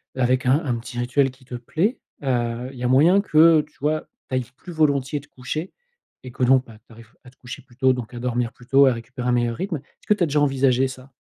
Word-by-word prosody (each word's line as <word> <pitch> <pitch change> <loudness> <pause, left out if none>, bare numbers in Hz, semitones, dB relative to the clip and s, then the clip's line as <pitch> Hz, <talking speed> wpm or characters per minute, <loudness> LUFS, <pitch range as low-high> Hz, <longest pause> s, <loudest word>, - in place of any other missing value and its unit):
avec 130 0 +1
un 135 +5 +3
un 130 -5 -1
petit 120 +1 -8
rituel 125 +3 +1
qui 130 0 -18
te 125 -1 -8
plaît, 165 - -1 0.2
heu, 120 -1 -1
il 135 - -13
y - - -5
a 125 - +1
moyen 155 +10 +5
que, 160 -4 +5
tu 155 - -29
vois? 155 +1 0 0.2
Tu 130 - -2
ailles 130 -1 -1
plus 180 - -11
volontiers 145 -3 +1
te 145 - -17
coucher 155 +7 -6 0.5
et 130 - -9
que, 125 - -3
donc, 130 +1 +4
bah, 110 -2 -14
tu 115 - -18
arrives 115 0 -16
à - - -12
te 125 - -24
coucher 120 - -9
plus 120 - -22
tôt, 130 +1 +3
donc 125 -2 -5
à 120 - -6
dormir 120 -1 -2
plus 125 - -17
tôt, 140 0 +6
à 130 - +4
récupérer 125 +2 -6
un 125 - +2
meilleur 120 -1 0
rythme. 190 -2 -3
Est-ce 140 - -20
que - - +5
tu 205 - 0
as - - +4
déjà 150 0 +1
envisagé 135 -2 +2
ça? 130 +1 -11
130 Hz, 265 wpm, -22 LUFS, 125-145 Hz, 0.5 s, tôt